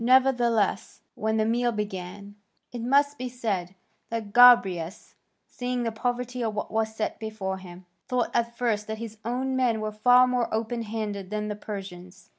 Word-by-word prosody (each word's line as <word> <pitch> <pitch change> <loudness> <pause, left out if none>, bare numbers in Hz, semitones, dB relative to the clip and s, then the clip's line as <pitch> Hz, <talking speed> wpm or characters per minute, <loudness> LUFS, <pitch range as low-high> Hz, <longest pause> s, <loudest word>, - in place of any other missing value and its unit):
Nevertheless, 245 -3 +2
when 220 +1 -1
the 215 - +2
meal 240 +2 +1
began, 200 -1 -5 0.4
it 240 - -6
must 285 +4 +2
be 255 0 -3
said 200 -7 -3 0.3
that 220 -3 -4
Gobryas, 200 -8 +5 0.3
seeing 250 0 -3
the 230 - -1
poverty 245 +2 -2
of 220 -2 -2
what 210 - -4
was 220 0 -1
set 220 - -3
before 210 -4 -4
him, 180 0 -12 0.2
thought 250 -1 0
at 235 0 0
first 215 -4 0
that 220 0 -4
his 220 -1 -8
own 255 +3 -1
men 245 -4 +2
were 215 0 -3
far 245 +4 +5
more 250 -2 0
open 230 +2 -2
handed 210 -3 -4
than 210 0 -3
the 210 - -3
Persians. 190 -3 -9
220 Hz, 170 wpm, -26 LUFS, 210-245 Hz, 0.4 s, Gobryas